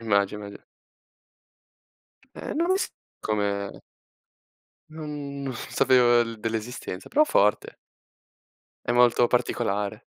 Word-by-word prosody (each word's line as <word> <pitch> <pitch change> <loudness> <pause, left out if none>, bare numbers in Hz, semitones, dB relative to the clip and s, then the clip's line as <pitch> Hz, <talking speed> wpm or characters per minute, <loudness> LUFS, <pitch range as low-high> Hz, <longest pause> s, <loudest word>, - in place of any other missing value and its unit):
Immagino. 100 -1 -1 1.8
Eh - - -5
non 335 +3 0
lo 375 - +3
s - - -2 0.3
come 100 -2 -2 1.1
Non 150 -3 -6
non 135 -1 -3
sapevo 120 0 +3
l 115 -1 -4
dell'esistenza, 110 -3 -5
però 305 +1 +4
forte. 105 - +2 1.1
È - - +3
molto 120 0 +5
particolare. 110 -3 -1
115 Hz, 95 wpm, -26 LUFS, 105-130 Hz, 1.8 s, molto